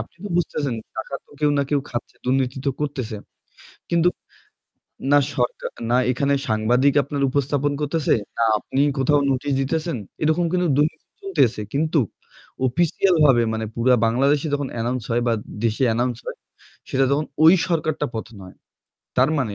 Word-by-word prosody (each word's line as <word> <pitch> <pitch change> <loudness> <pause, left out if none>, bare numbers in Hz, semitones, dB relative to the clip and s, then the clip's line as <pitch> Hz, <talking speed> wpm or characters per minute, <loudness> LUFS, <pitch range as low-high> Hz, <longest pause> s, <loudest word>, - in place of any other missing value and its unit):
আপনি 110 - -9
তো 205 - -4
বুঝতেছেন 145 -6 -1 0.2
টাকা 110 +5 -5
তো - - -29
কেউ 150 -1 +3
না 140 - +3
কেউ 145 - +2
খাচ্ছে। 120 - -5
দুর্নীতি 130 0 0
তো 140 - +4
করতেছে। 135 -7 -3 0.7
কিন্তু 170 0 +3 1.0
না 145 - +7 0.2
সরকা 120 -1 -1 0.2
না 120 - +4 0.2
এখানে 140 +3 +1
সাংবাদিক 120 +6 +2
আপনার 140 0 -3
উপস্থাপন 145 +1 0
করতেছে, 150 +1 +1 0.2
না 115 - +3
আপনি 135 - -3 0.2
কোথাও 145 +2 +3
নোটিশ 135 +2 -1
দিতেছেন। 160 +3 -1 0.3
এরকম 160 +3 +2
কিন্তু 180 -1 +1
দুর্নীতি 150 +2 0 0.2
চলতেছে। 145 - +1
কিন্তু 155 +2 +1 0.7
অফিসিয়ালভাবে 150 -2 +3
মানে 110 0 -2
পুরা 125 +2 +3
বাংলাদেশে 140 +6 +2
যখন 145 -1 -2
announce 120 0 -2
হয় 120 +1 +1
বা 115 - +3 0.3
দেশে 115 +3 +1
announce 120 0 -1
হয়, - - -6 0.5
সেটা 135 0 +2
তখন 145 +2 +1 0.2
ওই 165 +3 +9
সরকারটা 155 -3 0
পতন 110 0 -6
হয়। 90 - -13 0.6
তার 130 +3 +4
মানে 115 -7 -1
140 Hz, 155 wpm, -22 LUFS, 125-150 Hz, 1.0 s, ওই